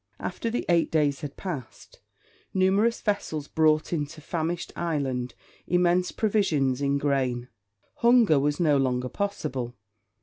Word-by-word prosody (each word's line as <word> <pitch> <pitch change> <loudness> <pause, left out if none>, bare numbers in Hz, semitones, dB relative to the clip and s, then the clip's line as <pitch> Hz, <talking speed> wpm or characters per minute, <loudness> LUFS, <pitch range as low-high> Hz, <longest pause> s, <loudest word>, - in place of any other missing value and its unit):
After 230 - -3
the 235 - -2
eight 170 -1 +3
days 145 -3 +1
had 145 -2 -7
passed, 150 - -7 0.6
numerous 195 +5 +2
vessels 160 -8 -2
brought 155 +1 +2
into 150 -1 -3
famished 165 +2 -3
Ireland 135 -7 -2 0.3
immense 180 +1 +2
provisions 155 - +1
in 140 0 +1
grain. 130 -4 -1 0.5
Hunger 235 - +5
was 145 +1 0
no 155 -5 +4
longer 125 -1 0
possible. 130 - -3
155 Hz, 125 wpm, -26 LUFS, 135-180 Hz, 0.6 s, Hunger